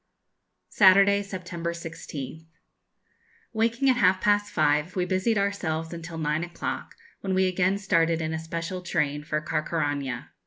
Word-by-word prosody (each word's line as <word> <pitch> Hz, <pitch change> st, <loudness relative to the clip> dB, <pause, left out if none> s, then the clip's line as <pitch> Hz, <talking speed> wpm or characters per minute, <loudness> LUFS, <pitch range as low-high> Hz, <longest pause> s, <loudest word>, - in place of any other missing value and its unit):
_ -, -, -17 dB
Saturday, 200 Hz, 0 st, +6 dB
September 175 Hz, -4 st, -5 dB
16th. 160 Hz, -2 st, -7 dB, 1.1 s
Waking 230 Hz, +4 st, +1 dB
at 255 Hz, -2 st, +4 dB
half 185 Hz, -5 st, +4 dB
past 205 Hz, +1 st, +2 dB
five, 150 Hz, +3 st, +1 dB
we 180 Hz, -2 st, +1 dB
busied 190 Hz, +4 st, +1 dB
ourselves 175 Hz, -5 st, -1 dB
until 170 Hz, 0 st, -7 dB
nine 155 Hz, +1 st, 0 dB
o'clock, 175 Hz, 0 st, -5 dB, 0.2 s
when 190 Hz, -1 st, -2 dB
we 190 Hz, 0 st, +3 dB
again 185 Hz, +1 st, +1 dB
started 165 Hz, -5 st, +2 dB
in 160 Hz, 0 st, -2 dB
a 160 Hz, -, -2 dB
special 165 Hz, +3 st, -4 dB
train 150 Hz, -4 st, -1 dB
for 150 Hz, 0 st, -1 dB
Carcaraña. 145 Hz, -4 st, -2 dB
170 Hz, 145 wpm, -26 LUFS, 160-195 Hz, 1.1 s, Saturday